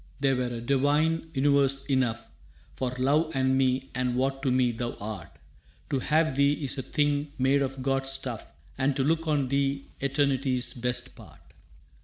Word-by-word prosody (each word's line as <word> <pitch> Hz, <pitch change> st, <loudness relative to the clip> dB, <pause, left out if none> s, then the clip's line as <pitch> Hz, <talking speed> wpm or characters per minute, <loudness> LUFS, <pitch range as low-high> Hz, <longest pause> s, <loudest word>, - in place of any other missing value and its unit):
That 135 Hz, -1 st, +2 dB
were 125 Hz, -, 0 dB
a 120 Hz, -1 st, -4 dB
divine 145 Hz, +6 st, +1 dB
universe 135 Hz, 0 st, +2 dB
enough 130 Hz, -5 st, 0 dB, 0.5 s
For 130 Hz, -, -2 dB
love 150 Hz, +5 st, +2 dB
and 130 Hz, 0 st, +2 dB
me 130 Hz, 0 st, +1 dB
and 125 Hz, -1 st, -1 dB
what 135 Hz, +1 st, 0 dB
to 135 Hz, -, 0 dB
me 125 Hz, -1 st, +3 dB
thou 120 Hz, +1 st, -4 dB
art. 100 Hz, -6 st, -8 dB, 0.5 s
To 135 Hz, -, +1 dB
have 155 Hz, +1 st, +1 dB
thee 140 Hz, +1 st, +4 dB
is 140 Hz, -2 st, -3 dB
a -, -, 0 dB
thing 145 Hz, +1 st, 0 dB
made 135 Hz, +2 st, +3 dB
of 135 Hz, -1 st, -3 dB
gods' 135 Hz, 0 st, 0 dB
stuff -, -, -5 dB, 0.3 s
And 135 Hz, +1 st, +1 dB
to 135 Hz, -, +1 dB
look 165 Hz, +3 st, +1 dB
on 145 Hz, -4 st, +1 dB
thee 140 Hz, 0 st, -1 dB
eternity's 135 Hz, -2 st, +1 dB
best 125 Hz, 0 st, -2 dB
part. -, -, -16 dB
135 Hz, 170 wpm, -27 LUFS, 130-140 Hz, 0.5 s, thee